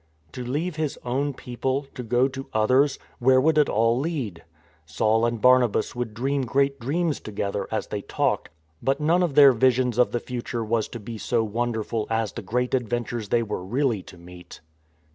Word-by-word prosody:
To 125 - -6
leave 150 +7 -2
his 155 -3 -2
own 135 +3 -1
people, 130 +3 -3
to 125 - -6
go 125 +2 +2
to 135 0 -7
others 130 +6 +3
— - - -32
where 130 +1 +5
would 155 +3 +3
it 150 - +3
all 115 +3 +2
lead? 135 - -3 0.4
Saul 110 +9 +1
and 120 -1 -2
Barnabas 125 -3 +3
would 120 -3 -4
dream 135 +4 0
great 140 +2 +1
dreams 155 +6 -1
together, 100 -1 -3
as 110 - -2
they 105 - -4
talked; - - -1 0.3
but 135 +2 0
none 165 +4 +2
of 170 -6 0
their 140 -2 +9
visions 125 0 +2
of 125 - +4
the 120 - -1
future 120 -1 -4
was 110 0 0
to 120 - -8
be 110 +1 -8
so 115 0 0
wonderful 110 0 -2
as 115 -2 0
the 115 - -6
great 125 +5 -2
adventures 120 -3 -2
they 120 -1 +2
were 105 -4 -4
really 120 +1 0
to 90 - -14
meet. 90 +1 -13
120 Hz, 190 wpm, -25 LUFS, 110-135 Hz, 0.4 s, their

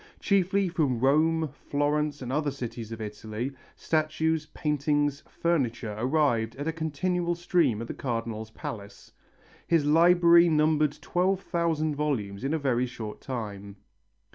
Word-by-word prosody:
Chiefly 195 0 +2
from 155 -9 0
Rome, 155 +4 +3 0.2
Florence 145 0 0
and 125 - -5
other 150 0 +1
cities 120 -4 -6
of 115 0 -6
Italy, 110 +4 -5 0.2
statues, 155 0 0
paintings, 145 -1 0
furniture 125 -10 -1
arrived 120 -2 +1
in 145 +3 -5
a 160 - 0
continual 170 +2 -1
stream 170 - +1
at - - -8
the - - -4
Cardinal's 115 -3 -4
palace. 105 -2 -8 0.6
His 165 -4 +3
library 170 +2 +6
numbered 155 -1 +2
twelve 185 +2 +1
thousand 165 -4 0
volumes 120 -9 -2
in 135 - -1
a - - +1
very 125 -4 0
short 110 -3 -7
time. 100 -6 -6
145 Hz, 135 wpm, -27 LUFS, 120-160 Hz, 0.6 s, library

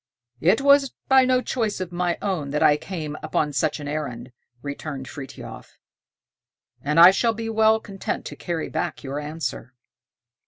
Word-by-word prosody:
"It 190 +10 +3
was 280 -1 +5 0.2
by 265 -1 +6
no 255 0 +3
choice 225 -6 -1
of 185 -2 -4
my 175 -1 -1
own 180 -8 -2
that 150 +1 0
I 145 - +6
came 155 -2 -5
upon 150 -1 -1
such 155 +3 0
an 145 - -6
errand," 130 -5 -4 0.3
returned 140 -2 -6
Frithiof, 135 -3 -10 1.0
"and 150 +3 +1
I 175 +2 +11
shall 225 +3 +1
be 225 +1 -4
well 220 0 +4
content 195 -3 -5
to - - -7
carry 170 -3 -3
back - - -3
your 140 +1 -4
answer." 150 -4 -5
165 Hz, 160 wpm, -24 LUFS, 145-220 Hz, 1.0 s, I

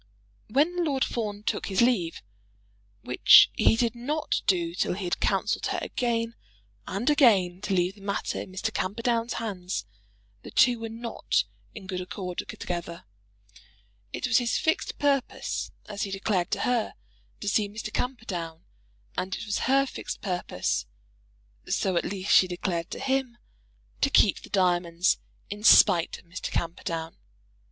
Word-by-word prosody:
When 320 +9 +2
Lord 275 -5 +1
Fawn 210 -3 -4
took - - -2
his 190 -2 -1
leave, 230 -9 +2 0.8
which - - +7
he - - +4
did 230 -1 +1
not 290 +6 -2
do 170 -3 +2
till 180 - 0
he 200 - -5
had 175 - -1
counselled - - 0
her - - -1
again 230 -2 -1 0.5
and 200 +6 -3
again 200 - +4
to 200 -2 -1
leave 180 +1 +1
the 200 - -18
matter 200 0 -2
in - - -9
Mr. 185 - -3
Camperdown's 230 +4 -1
hands, 185 - -4 0.6
the - - -10
two 245 -2 +4
were 225 0 -5
not 230 +1 -1 0.3
in 210 -4 -9
good 185 -1 -4
accord 180 -1 -5
together. 170 -1 -5 1.1
It - - -3
was 240 0 +4
his 240 -1 0
fixed 320 - 0
purpose, 280 -3 -1 0.2
as 200 -1 -6
he 200 - -1
declared 195 -2 -1
to - - -1
her, 245 -3 0 0.4
to 205 - -6
see 205 0 +2
Mr. 215 +1 -7
Camperdown; 180 -10 -4 0.5
and 185 0 -2
it - - -6
was 205 -1 -1
her 275 +1 +4
fixed - - -6
purpose, 175 - -2 0.8
so, 190 -2 0
at 170 - +1
least, 190 0 -1
she 185 - +7
declared 175 -1 -3
to - - -6
him, 265 -2 -1 0.6
to - - +3
keep - - +4
the - - -12
diamonds, 175 -2 +2 0.3
in 205 +1 -6
spite 180 -6 +6
of - - -18
Mr. 175 +2 -6
Camperdown. 165 -1 -3
205 Hz, 155 wpm, -27 LUFS, 180-235 Hz, 1.1 s, which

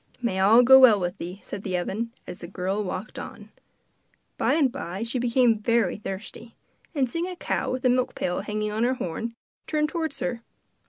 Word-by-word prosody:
'May 235 -6 -1
all 220 +6 +6
go 265 +2 +9
well 235 -6 +7
with 180 -1 -3
thee,' 180 +3 -6
said 205 - -6
the 185 -3 -2
oven, 215 +6 -3
as 180 - -8
the 170 - -8
girl 190 +3 -2
walked 190 +2 -5
on. - - -9 0.8
By - - +1
and 285 -6 +3
by 180 +1 -5
she 235 +2 -1
became 240 -2 +3
very 230 +2 +1
thirsty, 215 +3 -8 0.4
and 270 -3 +2
seeing 335 +8 -3
a 365 - -6
cow - - -2
with 255 0 -3
a - - +6
milk 250 0 +1
pail 180 - -1
hanging 210 0 -3
on 220 +2 -1
her 255 +2 +2
horn, 230 +3 -4 0.3
turned 300 -1 +1
towards 320 -3 -3
her. 245 -3 -3
230 Hz, 200 wpm, -25 LUFS, 195-255 Hz, 0.8 s, go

